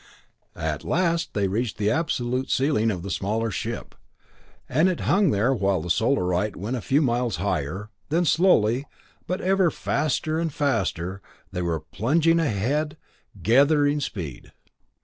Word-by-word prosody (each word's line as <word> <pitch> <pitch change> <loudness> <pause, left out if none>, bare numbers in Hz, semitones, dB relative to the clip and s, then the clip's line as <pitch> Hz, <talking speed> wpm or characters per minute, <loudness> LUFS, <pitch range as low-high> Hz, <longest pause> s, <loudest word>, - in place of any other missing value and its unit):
At - - -3
last 170 -1 0
they 100 -2 +1
reached 110 +4 -2
the 105 0 +1
absolute 130 -5 -1
ceiling 130 -5 +2
of 90 -5 -3
the 100 - -5
smaller 110 +4 -1
ship, - - -5 0.7
and 155 +8 +3
it 180 - -2
hung 195 +1 +3
there 110 +6 +2
while 100 -5 +1
the 85 +2 -3
Solarite 105 -4 +1
went 105 +7 -3
a 120 - -3
few 140 +7 +2
miles 120 -3 0
higher; 95 +3 -3 0.2
then 170 +4 +2
slowly, 140 - +3 0.4
but 180 - -2
ever 190 -1 +3
faster 155 +1 -1
and 165 -1 -1
faster 100 - -1 0.3
they 90 - -3
were 85 -3 -1
plunging 150 - +2
ahead, 150 +4 0 0.5
gathering 145 - +4
speed. 85 - -6
125 Hz, 145 wpm, -24 LUFS, 100-155 Hz, 0.7 s, gathering